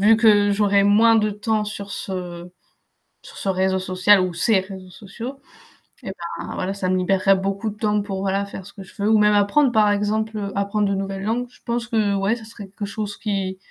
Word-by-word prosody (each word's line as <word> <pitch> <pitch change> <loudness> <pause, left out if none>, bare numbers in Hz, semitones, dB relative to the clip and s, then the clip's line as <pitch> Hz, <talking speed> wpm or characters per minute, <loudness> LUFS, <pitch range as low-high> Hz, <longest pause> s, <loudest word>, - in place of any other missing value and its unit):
vu 215 +2 +6
que 210 -2 +4
j'aurai 200 -1 +3
moins 220 +3 +5
de 215 -1 +2
temps 210 +1 -1
sur 205 -1 -6
ce 180 -2 -6 0.7
sur - - -14
ce 195 - -3
réseau 190 0 +1
social 185 +1 +3
ou 185 -1 -2
ces 190 +4 +2
réseaux 190 -1 -10
sociaux, 230 +8 -9 0.6
et, 195 - -5 0.3
bah, - - -6
voilà 190 +1 -2
ça 195 -2 -3
me 185 - +2
libérerait 195 +1 +3
beaucoup 195 +3 -2
de 210 - -8
temps 210 -1 +1
pour 200 -2 -5
voilà 195 +1 0
faire 195 -1 -9
ce 200 - -12
que 195 - -10
je 190 - -17
veux 205 - +2
ou 220 - +5
même 210 0 +4
apprendre 225 +7 +3
par 210 -1 +4
exemple. 210 0 -1
Apprendre 200 +1 0
de 200 - 0
nouvelles 195 0 -4
langues, 235 +3 -1
je - - -21
pense 235 0 -2
que 215 -4 +1
ouais 195 +4 +1
ça 220 - -12
serait 215 -2 -10
quelque 200 +1 -6
chose 205 0 -5
qui 195 -3 -3
200 Hz, 220 wpm, -22 LUFS, 195-215 Hz, 0.7 s, vu